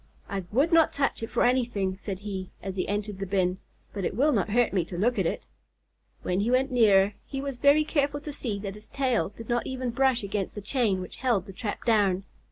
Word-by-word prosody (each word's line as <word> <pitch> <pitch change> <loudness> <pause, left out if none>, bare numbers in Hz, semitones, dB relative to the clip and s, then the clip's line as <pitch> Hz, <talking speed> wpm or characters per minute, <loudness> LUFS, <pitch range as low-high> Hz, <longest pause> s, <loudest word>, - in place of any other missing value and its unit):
"I 195 -3 -4
would 280 +10 +2
not 325 -1 +6
touch 275 -4 0
it 225 - -4
for - - +1
anything," 240 -7 +1
said 195 -1 -6
he, 195 -3 -5
as 195 -1 -4
he 185 - -1
entered 205 -1 -2
the 195 - -3
bin, 185 -1 +1 0.3
"but 200 - -4
it 190 - -1
will 285 +7 +3
not 220 -5 +1
hurt 235 +1 +2
me 185 -3 +2
to 175 - -7
look 240 +6 +1
at - - +2
it." - - -3 0.8
When 180 +1 0
he 210 +4 +1
went 260 +2 +2
nearer, 205 -5 +5
he 270 - -4
was 275 -2 -4
very 285 +3 +5
careful 290 -1 0
to 295 0 -6
see 235 -7 -3
that 200 -1 -4
his 210 +1 -13
tail 255 -10 0
did 220 +2 -11
not 240 -1 0
even 255 -2 -3
brush 260 -1 +2
against 200 -1 -3
the 205 - -5
chain 210 -3 +1
which 185 - -8
held 240 -7 +1
the 195 - -10
trap 205 +2 -5
down. 200 -5 +3
215 Hz, 235 wpm, -27 LUFS, 195-255 Hz, 0.8 s, not